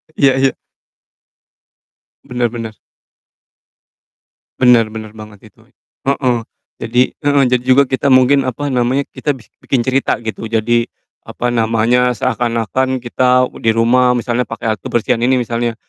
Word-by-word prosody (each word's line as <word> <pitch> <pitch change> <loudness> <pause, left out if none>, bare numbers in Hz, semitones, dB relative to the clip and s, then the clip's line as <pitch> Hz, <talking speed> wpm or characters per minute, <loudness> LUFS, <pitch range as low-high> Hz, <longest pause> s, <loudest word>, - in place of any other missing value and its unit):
Iya 140 -1 +4
iya. 135 0 +2 1.7
Bener 125 -1 -2
bener. 110 -3 -7 1.8
Bener 120 -3 +4
bener 110 -1 -8
banget 105 -2 -13
itu. - - -24 0.5
Heeh. 130 -3 +1 0.4
Jadi 125 +2 +1
heeh, 145 -1 +2
jadi 125 -1 +2
juga 130 +2 +4
kita 130 +1 -2
mungkin, 130 +1 +4
apa 140 +3 -3
namanya, 125 +3 +1
kita 145 -2 -2
bi 120 - -15 0.2
bikin 125 -3 0
cerita 130 +2 0
gitu. 110 0 -5
Jadi, 115 +1 0 0.4
apa 120 0 -3
namanya, 115 +2 +1
seakan-akan 120 +2 -1
kita 125 +1 +2
di 115 - +1
rumah 125 +2 +3
misalnya 120 0 -1
pakai 115 -1 -3
alat 105 - -10
kebersihan 115 0 -1
ini 130 +2 +3
misalnya. 120 -1 -2
125 Hz, 130 wpm, -16 LUFS, 115-130 Hz, 1.8 s, Iya